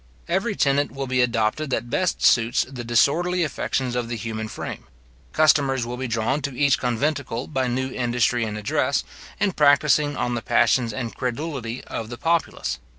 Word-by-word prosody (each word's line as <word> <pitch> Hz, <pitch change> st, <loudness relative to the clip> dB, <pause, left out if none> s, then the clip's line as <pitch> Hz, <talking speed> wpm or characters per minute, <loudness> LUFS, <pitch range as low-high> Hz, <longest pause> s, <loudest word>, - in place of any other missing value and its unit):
Every 195 Hz, +5 st, 0 dB
tenet 140 Hz, -2 st, +2 dB
will 135 Hz, 0 st, -4 dB
be 130 Hz, -1 st, +1 dB
adopted 120 Hz, +4 st, 0 dB
that 120 Hz, -2 st, -2 dB
best 185 Hz, -1 st, 0 dB
suits 115 Hz, 0 st, +4 dB
the 130 Hz, -2 st, -7 dB
disorderly 170 Hz, +10 st, +2 dB
affections 130 Hz, -4 st, -2 dB
of 120 Hz, -1 st, -2 dB
the 120 Hz, -, -2 dB
human 110 Hz, 0 st, -4 dB
frame. -, -, -7 dB, 0.5 s
Customers 140 Hz, -5 st, +3 dB
will 120 Hz, +1 st, -4 dB
be 130 Hz, +1 st, -4 dB
drawn 115 Hz, +5 st, 0 dB
to 140 Hz, -3 st, -4 dB
each 140 Hz, +1 st, +3 dB
conventicle 125 Hz, 0 st, -1 dB
by 130 Hz, -4 st, -1 dB
new 130 Hz, +2 st, -2 dB
industry 120 Hz, -1 st, +1 dB
and 105 Hz, -1 st, -3 dB
address, 105 Hz, -1 st, 0 dB, 0.4 s
in 200 Hz, -, +2 dB
practising 145 Hz, -1 st, +3 dB
on 120 Hz, -, -1 dB
the 120 Hz, -, -2 dB
passions 120 Hz, 0 st, +2 dB
and 115 Hz, +1 st, -5 dB
credulity 125 Hz, -2 st, -4 dB
of 110 Hz, -1 st, -6 dB
the 120 Hz, -, -7 dB
populace. 165 Hz, -, -1 dB
130 Hz, 170 wpm, -23 LUFS, 120-145 Hz, 0.5 s, suits